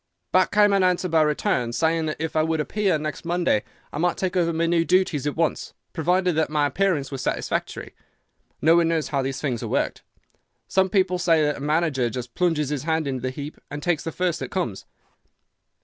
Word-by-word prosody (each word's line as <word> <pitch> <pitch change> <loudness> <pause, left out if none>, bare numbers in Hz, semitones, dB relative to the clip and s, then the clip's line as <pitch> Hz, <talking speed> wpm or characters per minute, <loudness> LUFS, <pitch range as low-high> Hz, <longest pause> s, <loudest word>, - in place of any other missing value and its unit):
Back 185 0 +4
came 205 0 +4
an 195 - +3
answer 185 0 +2
by 165 -2 +3
return, 150 -5 0
saying 160 +3 +1
that 155 - -2
if 160 0 -3
I 155 - +4
would 160 0 0
appear 190 +2 +1
next 155 0 -5
Monday 170 -10 +1 0.3
I 145 - -4
might 175 +1 +1
take 185 -1 -2
over 170 -2 +2
my 165 +1 0
new 165 0 +2
duties 165 -6 +1
at 145 - -2
once, 165 -1 -1 0.2
provided 180 +3 +1
that 160 0 +1
my 150 -1 +1
appearance 150 -2 0
was 135 -2 -4
satisfactory. - - -3 0.7
No 165 +2 +6
one 170 -1 +4
knows 165 -2 0
how 140 -2 0
these 135 0 -3
things 125 -6 -2
are - - -4
worked. - - -1 0.7
Some 190 0 +2
people 185 -2 +1
say 165 -3 +3
that 150 0 +2
the - - -9
manager 150 -4 +1
just 120 0 -6
plunges 165 -5 +1
his 145 -3 -2
hand 160 0 0
into 130 -2 -3
the 130 - -2
heap 145 +3 -7
and 145 0 -6
takes 175 -4 0
the 165 - -4
first 180 0 -1
that - - -5
comes. 170 - -3
160 Hz, 210 wpm, -24 LUFS, 145-175 Hz, 0.7 s, No